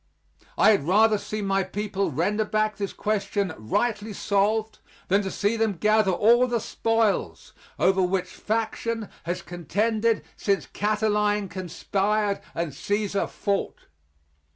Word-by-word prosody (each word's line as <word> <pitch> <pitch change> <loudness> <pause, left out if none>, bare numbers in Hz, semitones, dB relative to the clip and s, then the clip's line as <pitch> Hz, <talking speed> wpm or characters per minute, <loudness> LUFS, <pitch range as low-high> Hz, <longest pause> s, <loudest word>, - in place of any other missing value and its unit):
I 220 - +6
had 180 -9 +1
rather 215 +3 +4
see 215 0 -4
my 195 0 +1
people 195 +1 -2
render 190 +9 0
back 215 0 0
this 200 -2 -3
question 200 -3 -1
rightly 210 - -1
solved 210 +3 0 0.3
than 200 +2 +4
to 195 - -3
see 205 +3 0
them 220 -2 +1
gather 215 +3 +3
all 235 +7 +4
the 240 -1 0
spoils 225 -1 -1 0.2
over 190 0 +3
which 185 0 +1
faction 225 0 -2 0.2
has 175 +1 -3
contended 215 +6 0
since 200 -1 0
Cataline 210 -1 0
conspired 200 +3 -1
and 170 -2 -2
Cæsar 205 +7 -1
fought. 200 -1 -2
205 Hz, 130 wpm, -25 LUFS, 195-215 Hz, 0.3 s, I